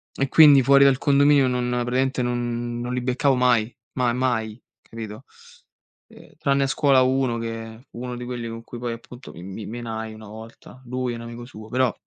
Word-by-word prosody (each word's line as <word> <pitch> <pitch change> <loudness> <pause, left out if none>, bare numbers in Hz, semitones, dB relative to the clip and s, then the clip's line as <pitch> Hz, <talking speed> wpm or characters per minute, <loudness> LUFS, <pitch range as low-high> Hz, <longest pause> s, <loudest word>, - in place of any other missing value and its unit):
E 135 0 0
quindi 145 -4 +7
fuori 140 +2 +6
dal 135 -1 +4
condominio 140 -1 +4
non 125 -1 -1
praticamente 125 +2 0
non 120 -1 -2
non 125 +1 -4
li 125 - -1
beccavo 130 +2 +1
mai 125 -2 +2 0.2
mai 125 -2 +1
mai, 120 -3 -1 0.2
capito? 110 -2 -9 0.8
Ehm, - - -17
tranne 140 0 +1
a - - +1
scuola 135 -1 +3
uno, 130 -2 +1
che 115 +1 -7
fu 120 - -11
uno 125 -1 -5
di 125 - -6
quelli 120 -2 -5
con 115 0 -7
cui 120 - -9
poi, 120 0 -4
appunto, 120 +2 -11
mi 85 - -11
mi 95 +2 -7
menai 110 -1 -6
una 110 -1 -12
volta 115 +4 -12
lui 125 0 -3
e - - -5
un 115 - -8
amico 120 +1 -8
suo 110 -3 -12
però, 125 -1 +1
120 Hz, 200 wpm, -23 LUFS, 115-130 Hz, 0.8 s, quindi